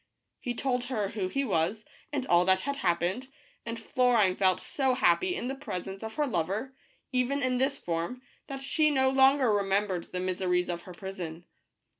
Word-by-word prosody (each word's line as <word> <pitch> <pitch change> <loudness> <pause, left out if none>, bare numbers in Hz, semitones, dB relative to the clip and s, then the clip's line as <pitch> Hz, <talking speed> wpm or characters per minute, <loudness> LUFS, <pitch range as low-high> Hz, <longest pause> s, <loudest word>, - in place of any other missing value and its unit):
He 245 -3 -3
told 250 -1 -1
her 220 -6 -1
who 195 -3 -2
he 275 +8 -1
was 195 +2 0 0.3
and 280 -3 -2
all 175 -7 +5
that 190 0 +4
had 280 +5 -3
happened, 185 +4 0 0.4
and 230 0 -4
Florine 235 -7 +3
felt 185 -2 +3
so 265 -3 0
happy 260 - +3
in 245 - -3
the 265 - -2
presence 195 -8 -6
of 220 0 -6
her 300 - +1
lover, 210 - -2 0.4
even 255 +2 +1
in 255 -1 +1
this 275 +2 +1
form, 170 +10 -3 0.2
that 270 -1 -6
she 305 +2 +3
no 265 -2 +3
longer 265 -3 +5
remembered 195 -2 0
the 180 - -3
miseries 180 -1 0
of 170 -1 -3
her - - -8
prison. 175 -3 -7
220 Hz, 180 wpm, -29 LUFS, 185-265 Hz, 0.4 s, all